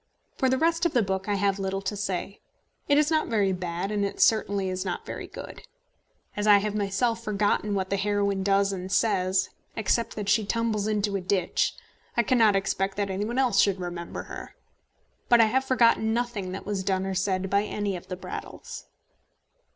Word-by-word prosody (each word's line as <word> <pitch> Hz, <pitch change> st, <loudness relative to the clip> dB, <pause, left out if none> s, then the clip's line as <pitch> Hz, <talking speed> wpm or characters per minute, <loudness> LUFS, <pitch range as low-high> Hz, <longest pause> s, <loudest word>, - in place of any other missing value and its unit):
For 265 Hz, -, +1 dB
the 260 Hz, -, +2 dB
rest 330 Hz, +3 st, +1 dB
of 335 Hz, -, -7 dB
the 240 Hz, -, +3 dB
book 190 Hz, +1 st, -2 dB
I 205 Hz, -, +2 dB
have 200 Hz, 0 st, +1 dB
little 195 Hz, 0 st, -2 dB
to 195 Hz, +2 st, -2 dB
say. 195 Hz, 0 st, -3 dB, 0.5 s
It 285 Hz, -, +4 dB
is 300 Hz, +1 st, +3 dB
not 315 Hz, -1 st, +2 dB
very 205 Hz, -4 st, +2 dB
bad, 180 Hz, +1 st, -3 dB
and 205 Hz, -1 st, 0 dB
it 200 Hz, -, -3 dB
certainly 200 Hz, -3 st, +3 dB
is 185 Hz, 0 st, -2 dB
not -, -, -4 dB
very -, -, -6 dB
good. -, -, -9 dB, 0.7 s
As 210 Hz, +1 st, -1 dB
I 205 Hz, -1 st, +8 dB
have 205 Hz, +1 st, -1 dB
myself 215 Hz, +3 st, 0 dB
forgotten 210 Hz, -1 st, 0 dB
what 190 Hz, -1 st, -2 dB
the 200 Hz, -, +2 dB
heroine 200 Hz, -1 st, 0 dB
does 195 Hz, 0 st, +2 dB
and 185 Hz, 0 st, -5 dB
says 190 Hz, -4 st, +1 dB, 0.2 s
except 225 Hz, +2 st, 0 dB
that 210 Hz, -2 st, -4 dB
she 220 Hz, +1 st, +3 dB
tumbles 215 Hz, -1 st, -1 dB
into 210 Hz, -1 st, 0 dB
a -, -, -5 dB
ditch 185 Hz, -1 st, 0 dB, 0.4 s
I 235 Hz, -, +4 dB
cannot 225 Hz, -3 st, +4 dB
expect 195 Hz, 0 st, -1 dB
that 200 Hz, -1 st, -1 dB
any 195 Hz, +2 st, -2 dB
one 240 Hz, +3 st, -3 dB
else 250 Hz, -7 st, +3 dB
should 200 Hz, -1 st, +3 dB
remember 175 Hz, -1 st, -5 dB
her. -, -, -9 dB, 0.7 s
But 240 Hz, -, +6 dB
I 225 Hz, -, +7 dB
have 265 Hz, +4 st, +1 dB
forgotten 230 Hz, -3 st, +3 dB
nothing 235 Hz, -6 st, -2 dB
that 195 Hz, -, -6 dB
was 200 Hz, -2 st, -2 dB
done 190 Hz, 0 st, 0 dB
or 195 Hz, -, -2 dB
said 190 Hz, 0 st, 0 dB
by 200 Hz, +1 st, +2 dB
any 205 Hz, -2 st, -2 dB
of 175 Hz, -, -9 dB
the 185 Hz, -, -4 dB
Brattles. 180 Hz, 0 st, -8 dB
200 Hz, 200 wpm, -26 LUFS, 190-220 Hz, 0.7 s, I